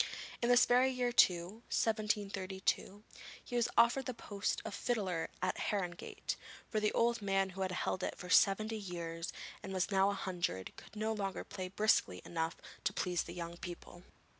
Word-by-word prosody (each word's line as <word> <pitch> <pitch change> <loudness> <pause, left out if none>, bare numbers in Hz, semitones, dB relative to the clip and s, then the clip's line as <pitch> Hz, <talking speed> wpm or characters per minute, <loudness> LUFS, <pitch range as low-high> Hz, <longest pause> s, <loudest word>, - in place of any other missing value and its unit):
In 235 - +2
this 245 0 +7
very 250 +2 +5
year 250 -1 0
too, 185 -1 +4
1732, 205 -2 0 0.4
he 245 - -5
was 240 -1 +2
offered 240 +3 +5
the 255 - -3
post 205 -2 -2
of 220 - -4
fiddler 190 -10 -1
at 185 - 0
Harrogate, 180 -4 -2 0.4
for 215 - +2
the 210 0 +2
old 235 -1 +2
man 195 -1 +1
who 190 +1 -6
had 190 -1 0
held 185 +1 -1
it - - -2
for 180 - -8
seventy 215 +4 +4
years, 170 -3 -4 0.3
and 195 - -6
was 185 +2 0
now 195 0 +4
a - - 0
hundred, 175 - -2
could - - -14
no 220 +1 0
longer 195 -3 -3
play 185 -1 -5
briskly 195 - +2
enough 165 -1 -2 0.3
to - - +1
please 180 -1 0
the 170 - -7
young 170 0 -5
people. 175 0 -8
195 Hz, 175 wpm, -35 LUFS, 180-220 Hz, 0.4 s, this